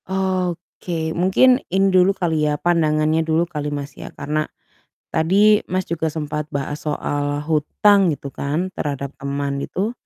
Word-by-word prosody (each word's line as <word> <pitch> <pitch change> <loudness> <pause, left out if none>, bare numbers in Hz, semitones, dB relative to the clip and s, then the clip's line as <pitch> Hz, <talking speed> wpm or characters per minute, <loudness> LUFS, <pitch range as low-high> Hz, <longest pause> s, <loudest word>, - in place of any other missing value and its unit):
Oke, 180 -3 -2
mungkin 250 +9 +4
ini 195 +2 +3
dulu 185 0 +5
kali 160 -4 +1
ya 150 - 0
pandangannya 155 -1 +2
dulu 160 +1 +1
kali 150 -3 -4
Mas, 145 0 -5
ya. - - -9
Karena 155 +1 -2 0.6
tadi 200 +6 +4
Mas, 185 +1 -1
juga 165 -1 -1
sempat 150 -1 -3
bahas 140 +1 -3
soal 145 0 -2
hutang 170 +6 +3
gitu 140 -1 -9
kan 155 +8 -2
terhadap 140 -2 -3
teman 140 0 -2
itu, 195 +9 -2
160 Hz, 145 wpm, -21 LUFS, 145-185 Hz, 0.6 s, dulu